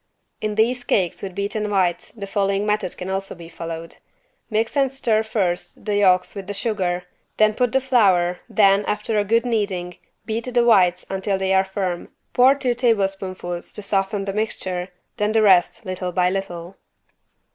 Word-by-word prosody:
In 215 -1 -2
these 245 +3 +1
cakes 185 -7 0
with 190 -2 -6
beaten 210 +1 -2
whites 180 -3 0
the 205 -3 -7
following 200 0 0
method 210 -3 -1
can 180 - -6
also 195 0 -3
be 170 -1 -11
followed: 165 0 -7 0.5
mix 225 +3 0
and 275 -2 +2
stir 235 -5 +1
first 185 -5 -2
the 210 -1 0
yolks 185 -2 +3
with 195 -2 -7
the 205 - -4
sugar, 190 -4 -1 0.3
then 215 0 +4
put 245 +1 +1
the 265 - +3
flour 190 -9 +3
then, 200 -1 +4
after 210 +1 -1
a - - +2
good 230 +4 +2
kneading, 195 -7 -2 0.3
beat 230 +3 -3
the 240 -1 +3
whites 180 -6 +4
until 195 +1 -1
they 190 0 0
are 190 0 +4
firm, 190 -2 -3 0.2
pour 260 +2 +6
two 260 -3 0
tablespoonfuls 195 -6 -1
to 210 - -7
soften 195 0 0
the 195 - -3
mixture, 185 -4 -2 0.3
then 210 +1 0
the 220 -1 +4
rest 190 +2 +4
little 185 -1 -3
by 180 +1 +2
little. 185 -2 -5
195 Hz, 175 wpm, -22 LUFS, 185-220 Hz, 0.5 s, pour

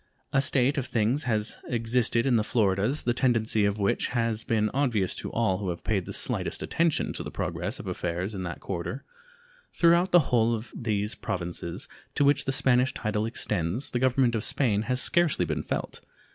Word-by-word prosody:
A 135 - +4
state 135 +1 +2
of 130 - -4
things 120 +6 +1
has 110 -2 -1
existed 115 0 +1
in 130 -3 +3
the 110 - +3
Floridas 105 +4 +1
the 120 - +1
tendency 115 -4 +2
of 100 +1 0
which 100 -2 0
has 115 -2 -1
been 110 -2 0
obvious 120 -9 +1
to - - -6
all 95 -5 +1
who 100 -3 -3
have 85 - -5
paid 100 -5 -1
the - - -5
slightest - - -1
attention 165 -2 0
to - - -4
the - - -5
progress - - -3
of - - -9
affairs 90 +4 -3
in 95 - -5
that 85 -1 -5
quarter. 95 +8 -4 0.7
Throughout 170 +2 +4
the 165 -7 +4
whole 115 0 +3
of 115 +1 -8
those 105 -2 -1
Provinces 85 -2 -5 0.3
to 145 - +3
which 140 0 +3
the 135 - 0
Spanish 130 -1 +2
title 105 0 -1
extends 105 - -1
the 120 - -1
Government 130 -1 +2
of 110 -2 -1
Spain 110 -8 +1
has 125 0 +1
scarcely 170 +4 +2
been - - -2
felt. - - -4
115 Hz, 190 wpm, -27 LUFS, 105-130 Hz, 0.7 s, A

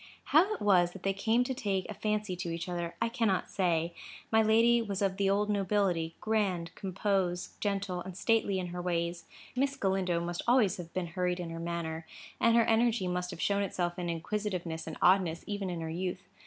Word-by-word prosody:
How 345 +8 +6
it - - -11
was 180 -4 +4
that 195 - -11
they 195 - +1
came 225 +5 +2
to 260 - -2
take 200 -7 -1
a - - -5
fancy 210 -2 -1
to 175 -1 -4
each 170 +1 -4
other, 175 -1 -3
I 230 - +2
cannot 230 -5 0
say. 170 -3 +1 0.4
My 220 0 +5
lady 230 +2 +5
was 200 -4 -3
of 195 -1 0
the 200 -1 +2
old 205 +1 +2
nobility,—grand, 195 -2 0
compose, 190 -2 -1
gentle, 195 -3 -1
and 185 0 -8
stately 220 -2 +2
in 180 -1 -3
her 175 0 -4
ways. 170 -1 -2 0.3
Miss 275 +2 +1
Galindo 190 -6 +1
must 175 0 -3
always 235 -7 +4
have 170 -2 -8
been 185 -1 0
hurried 180 +1 -1
in 170 -2 -4
her 165 - -5
manner, 165 -1 -4 0.3
and 230 0 +4
her 230 -1 +5
energy 225 -3 +2
must 180 0 -2
have 175 -3 -7
shown 200 +2 +1
itself 180 -2 -2
in 175 -1 -2
inquisitiveness 175 -1 -3
and 160 - -5
oddness 180 -3 +4
even 205 -2 -3
in 175 -2 -4
her 160 - -4
youth. 180 +2 -4
190 Hz, 200 wpm, -31 LUFS, 175-210 Hz, 0.4 s, How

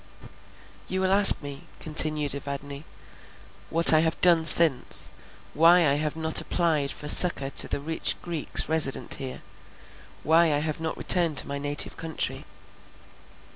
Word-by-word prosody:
"You 190 - -5
will 190 0 -2
ask 200 -5 +6
me," 140 -1 -11
continued 155 -2 0
Evadne, 140 +1 -10 0.8
"what 165 0 +5
I 155 - +3
have 160 +1 -4
done 170 -3 +2
since; 160 -6 +4 0.4
why 170 +4 +2
I 140 - 0
have 150 +1 -5
not 160 0 +1
applied 155 -5 -3
for 150 - -10
succour 150 -4 +5
to - - +1
the - - -6
rich 160 +3 -3
Greeks 170 -4 -6
resident 155 -4 -2
here; 130 -2 -7 0.8
why 165 +2 +1
I - - -2
have 155 +1 -6
not 160 -1 -7
returned 170 -5 +1
to - - 0
my 140 0 -7
native 145 +1 -2
country? 165 -1 -6
155 Hz, 145 wpm, -23 LUFS, 145-165 Hz, 0.8 s, ask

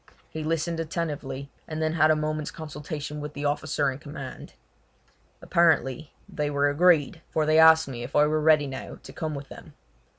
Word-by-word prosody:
He 160 - -5
listened 165 +1 -1
attentively, 145 -4 -4 0.2
and 155 -1 -5
then 155 0 0
had 155 -1 +4
a 155 - +5
moment's 155 0 -2
consultation 150 -1 -6
with 150 0 -6
the 145 +1 -4
officer 145 -1 0
in 130 - -8
command. 140 -3 -9 0.9
Apparently 160 -3 +2 0.2
they 150 -1 -2
were 145 0 +2
agreed, 165 0 +3
for 155 - 0
they 155 +1 +4
asked 160 -1 +7
me 125 -3 -6
if 120 +3 -7
I 150 - +6
were 155 +1 0
ready 155 -1 +4
now 135 -1 -7
to - - -11
come 155 -2 -4
with 140 -1 -8
them. - - -12
150 Hz, 185 wpm, -26 LUFS, 145-160 Hz, 0.9 s, asked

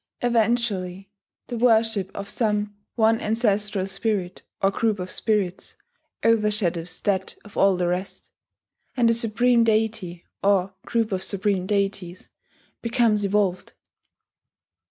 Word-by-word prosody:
Eventually 215 -5 0 0.3
the 240 -2 -5
worship 225 -5 +3
of 200 - -5
some 210 -1 -1 0.2
one 225 -1 +3
ancestral 210 -3 0
spirit, 195 -2 -2 0.2
or 195 - +2
group 220 +1 0
of 185 0 -4
spirits, 200 -5 -1 0.5
overshadows 210 -6 +1
that 190 -2 -1
of 210 - -14
all 195 -1 +4
the 180 - 0
rest; 180 +2 -4 0.7
and 235 -2 +4
a - - +3
supreme 235 +1 +2
deity, 215 -6 -1 0.2
or 195 -1 +2
group 230 -2 0
of 190 -1 -1
supreme 195 -1 0
deities, 195 -3 -2 0.5
becomes 230 -3 +2
evolved. 200 -2 0
205 Hz, 115 wpm, -24 LUFS, 190-225 Hz, 0.7 s, all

